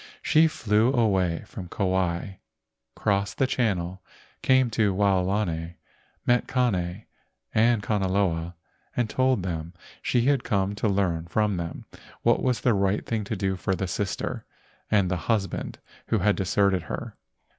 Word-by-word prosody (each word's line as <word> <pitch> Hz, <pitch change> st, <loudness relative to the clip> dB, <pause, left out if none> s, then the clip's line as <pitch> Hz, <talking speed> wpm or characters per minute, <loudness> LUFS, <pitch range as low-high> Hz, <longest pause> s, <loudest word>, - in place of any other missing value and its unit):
She 160 Hz, +1 st, +5 dB
flew 110 Hz, -4 st, +2 dB
away 95 Hz, -8 st, +1 dB
from 90 Hz, -, -8 dB
Kauai, 95 Hz, -1 st, -1 dB, 0.6 s
crossed 100 Hz, 0 st, 0 dB
the 135 Hz, -, +3 dB
channel, 95 Hz, -8 st, -1 dB, 0.4 s
came 130 Hz, -2 st, +3 dB
to 105 Hz, -2 st, +2 dB
Waolani, 95 Hz, -3 st, 0 dB, 0.5 s
met 120 Hz, 0 st, +2 dB
Kane 100 Hz, -6 st, 0 dB, 0.5 s
and 115 Hz, -1 st, +3 dB
Kanaloa 95 Hz, -5 st, 0 dB, 0.4 s
and 120 Hz, -2 st, +2 dB
told 130 Hz, -3 st, +1 dB
them 85 Hz, -1 st, -4 dB, 0.3 s
she 120 Hz, -, +1 dB
had 140 Hz, -2 st, +2 dB
come 100 Hz, -1 st, 0 dB
to 105 Hz, +1 st, 0 dB
learn 90 Hz, -4 st, 0 dB
from 105 Hz, +2 st, +1 dB
them 85 Hz, -1 st, -5 dB, 0.4 s
what -, -, +3 dB
was 125 Hz, -4 st, 0 dB
the 125 Hz, -, +3 dB
right 100 Hz, 0 st, +1 dB
thing 110 Hz, -2 st, -1 dB
to 110 Hz, -, -3 dB
do 95 Hz, -1 st, -1 dB
for 95 Hz, +1 st, -1 dB
the 95 Hz, -, -2 dB
sister 95 Hz, +2 st, -3 dB, 0.5 s
and 100 Hz, -4 st, +2 dB
the 90 Hz, -, +1 dB
husband 105 Hz, -4 st, -1 dB, 0.3 s
who 115 Hz, -, +2 dB
had 105 Hz, +1 st, +2 dB
deserted 95 Hz, -1 st, +2 dB
her. 80 Hz, -, -6 dB
100 Hz, 145 wpm, -26 LUFS, 90-110 Hz, 0.6 s, She